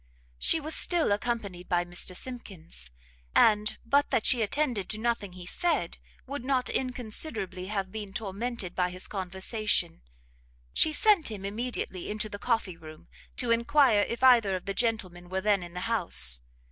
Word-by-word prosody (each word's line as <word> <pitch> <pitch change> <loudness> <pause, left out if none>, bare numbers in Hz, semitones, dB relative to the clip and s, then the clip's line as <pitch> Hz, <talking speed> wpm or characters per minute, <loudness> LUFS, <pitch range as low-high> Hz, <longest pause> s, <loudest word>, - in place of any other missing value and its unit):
She 325 - +4
was 310 +1 -2
still 340 - +2
accompanied 205 -4 -3
by 175 0 +1
Mr 175 +1 -1
Simkins, 180 - -6 0.5
and, 210 -1 +4
but 280 +4 +2
that 220 - 0
she 245 - +5
attended 230 -3 0
to 215 - -1
nothing 220 -4 -2
he 180 -1 -10
said, 300 - -1 0.3
would 280 -1 -6
not 255 -1 0
inconsiderably 220 - -3
have 195 -2 -3
been 210 -2 -6
tormented 205 -1 -3
by 180 -1 0
his 180 +1 -2
conversation. 190 - -1 0.7
She 315 - +3
sent 390 - +4
him 200 -3 -7
immediately 210 -3 -3
into 215 +1 -2
the 205 - -7
coffee 225 -8 -1
room, 155 -1 -13 0.3
to 245 -2 -1
enquire 235 -1 +4
if 235 +4 -3
either 235 -7 +6
of 185 - -6
the 200 - -2
gentlemen 190 -6 -2
were 190 +1 -1
then 205 -1 +2
in 175 0 -10
the 180 - -4
house. 175 - +2
210 Hz, 160 wpm, -28 LUFS, 185-245 Hz, 0.7 s, either